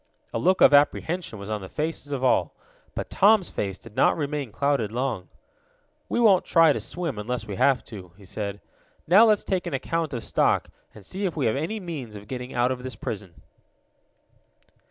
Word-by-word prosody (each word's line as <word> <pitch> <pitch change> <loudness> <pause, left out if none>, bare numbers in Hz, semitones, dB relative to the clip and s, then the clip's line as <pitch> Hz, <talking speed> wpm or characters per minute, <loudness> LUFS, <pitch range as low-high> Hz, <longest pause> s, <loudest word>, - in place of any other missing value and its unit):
A - - -1
look 185 +8 +2
of - - +7
apprehension 150 -1 +2
was 100 +1 -7
on 105 -1 -2
the 95 - -8
faces 155 -1 -4
of 135 -2 -2
all. 130 - +2 0.4
But - - -5
Tom's 205 -1 +4
face 95 -2 -3
did 115 -2 -15
not - - +3
remain 145 -5 -3
clouded 125 -2 0
long. 120 -6 -3 0.8
"We - - 0
won't 205 -6 +5
try 165 -3 +5
to - - -3
swim 165 -11 -4
until 115 +2 -4
we 100 -2 -5
have 135 -3 +3
to," 95 -6 -10
he 100 - -15
said. 100 +1 -5 0.4
"Now, 195 +7 +7
let's 210 -2 +3
take 185 -2 -2
an - - -2
account 165 +4 -2
of 115 - -4
stock, - - +1 0.3
and 105 - -13
see 195 - -4
if 170 - -6
we 140 - 0
have 110 - +2
any 165 +10 -2
means 150 - -7
of 105 0 -10
getting 125 0 -6
out 120 +1 +1
of 125 -1 -4
this 130 -2 -6
prison." 95 -7 -7
130 Hz, 195 wpm, -25 LUFS, 105-165 Hz, 0.8 s, of